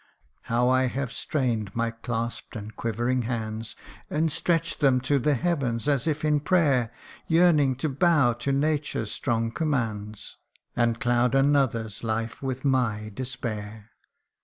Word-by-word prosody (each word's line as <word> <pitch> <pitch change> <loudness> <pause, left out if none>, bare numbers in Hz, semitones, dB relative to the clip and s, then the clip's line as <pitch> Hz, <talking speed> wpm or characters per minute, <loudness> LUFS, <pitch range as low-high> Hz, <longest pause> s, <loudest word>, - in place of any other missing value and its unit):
How 120 +1 +2
I 130 0 +3
have 130 0 -3
strain'd 115 -9 -2
my 115 0 0
clasp'd 115 0 -4
and 110 0 -7
quivering 120 +3 -1
hands, 110 -2 -4 0.3
And 155 +1 +1
stretch 165 +1 0
'd - - -21
them 135 -3 +4
to 140 +2 +1
the 145 +3 +2
heavens 135 -6 -1
as 140 0 +1
if 155 -1 0
in 150 -1 +3
prayer; 145 -8 +2 0.4
Yearning 160 -5 +4
to 130 +5 -2
bow 145 -3 +3
to 120 +4 -2
Nature's 145 -6 0
strong 115 -3 -1
commands, 110 -9 -3 0.4
And 115 -1 +1
cloud 120 -1 +2
another's 135 -7 +1
life 115 0 -2
with 130 0 -4
my 115 -6 +1
despair 110 -4 -5
125 Hz, 140 wpm, -26 LUFS, 115-145 Hz, 0.4 s, them